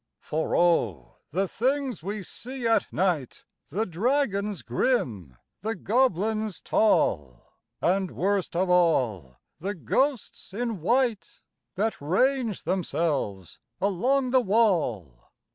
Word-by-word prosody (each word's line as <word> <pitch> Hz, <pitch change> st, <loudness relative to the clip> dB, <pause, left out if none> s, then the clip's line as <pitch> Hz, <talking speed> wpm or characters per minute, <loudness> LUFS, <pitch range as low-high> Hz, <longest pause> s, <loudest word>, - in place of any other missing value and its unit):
For 160 Hz, +1 st, -2 dB
O! 105 Hz, -, +1 dB
the 190 Hz, +4 st, 0 dB
things 260 Hz, -, -1 dB
we 200 Hz, +3 st, -4 dB
see 250 Hz, +5 st, -7 dB
at 225 Hz, -, +2 dB
night 175 Hz, -9 st, -1 dB, 0.2 s
The 210 Hz, +9 st, -1 dB
dragons 200 Hz, -, 0 dB
grim, 115 Hz, -, -1 dB, 0.2 s
the 220 Hz, +4 st, -3 dB
goblins 215 Hz, -1 st, 0 dB
tall, 75 Hz, -, +1 dB, 0.4 s
And, 190 Hz, +1 st, +2 dB
worst 195 Hz, 0 st, -1 dB
of 185 Hz, +2 st, +1 dB
all, 125 Hz, -, +2 dB, 0.2 s
the 200 Hz, +5 st, -3 dB
ghosts 220 Hz, -, -1 dB
in 230 Hz, -5 st, -3 dB
white 235 Hz, +2 st, 0 dB, 0.3 s
That 215 Hz, -1 st, -1 dB
range 230 Hz, -, +1 dB
themselves 150 Hz, -, -2 dB, 0.2 s
along 250 Hz, +7 st, +1 dB
the 260 Hz, 0 st, +5 dB
wall! 165 Hz, -, 0 dB
190 Hz, 110 wpm, -26 LUFS, 155-230 Hz, 0.4 s, the